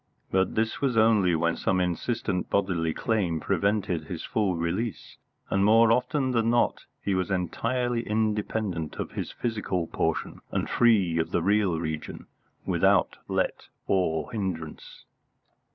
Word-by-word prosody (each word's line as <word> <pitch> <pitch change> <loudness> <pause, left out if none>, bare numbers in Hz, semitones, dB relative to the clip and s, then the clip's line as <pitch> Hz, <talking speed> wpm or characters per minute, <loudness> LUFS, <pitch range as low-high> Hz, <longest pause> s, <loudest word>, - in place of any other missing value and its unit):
But 95 0 +1
this 110 +1 0
was 130 -5 +1
only 105 -6 +4
when 85 +1 +1
some 95 -1 0
insistent 90 +2 -1
bodily 90 -5 +1
claim 95 -5 0
prevented 95 -2 0
his - - -6
full 100 -5 0
release, 90 +7 -3 0.3
and 100 - +2
more 110 +2 +6
often 130 +3 +1
than 115 -2 +2
not 120 0 +1 0.2
he 100 - 0
was 95 +1 0
entirely 115 +7 -1
independent 105 -5 -1
of - - -5
his - - -4
physical 105 -7 -2
portion - - -2
and - - -1
free 100 -9 +3
of 80 - 0
the 85 - 0
real 100 -3 +2
region, 80 -2 -5 0.4
without - - +2
let - - -1 0.2
or 90 0 0
hindrance. 95 -8 -5
100 Hz, 135 wpm, -27 LUFS, 85-115 Hz, 0.4 s, more